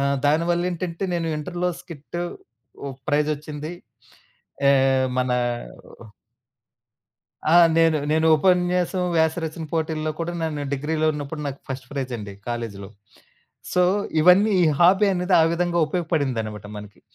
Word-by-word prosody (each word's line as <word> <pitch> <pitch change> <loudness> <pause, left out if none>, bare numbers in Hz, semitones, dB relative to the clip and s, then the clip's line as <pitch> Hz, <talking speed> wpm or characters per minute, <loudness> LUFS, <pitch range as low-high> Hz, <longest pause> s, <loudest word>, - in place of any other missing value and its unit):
ఆహ్, 140 0 +1
దానివల్లేంటంటే 175 +3 0
నేను 165 -1 -1
ఇంటర్‌లో 175 +3 -2
స్కిట్ 170 0 -9 0.7
ఓ - - -4 0.2
ప్రైజొచ్చింది. 150 +1 -1 0.9
ఏ 140 - +7 0.5
మనా 125 -1 +1 2.1
ఆ! 175 - +7 0.2
నేను 165 -2 +4
నేను 160 +1 +2
ఉపన్యాసం, 180 +1 +1
వ్యాసరచన 160 0 0
పోటీల్లో 155 -1 -1
కూడా 170 +1 -2
నను 150 -3 -2
డిగ్రీలో 155 +3 -1
ఉన్నప్పుడు 150 +1 -6
నాకు 140 0 -5
ఫస్ట్ 130 -1 -6
ప్రైజండి. 125 -7 -5 0.2
కాలేజీలో 115 -5 -5 0.8
సో, 180 - +3 0.4
ఇవన్నీ 180 +6 +6
ఈ - - +5
హాబీ 190 +4 +5
అనేది 180 +1 0
ఆ - - +6
విధంగా 175 0 0
ఉపయోగపడిందనమాట 135 - -2
మనకి. 105 -1 -11
160 Hz, 110 wpm, -23 LUFS, 140-175 Hz, 2.1 s, ఏ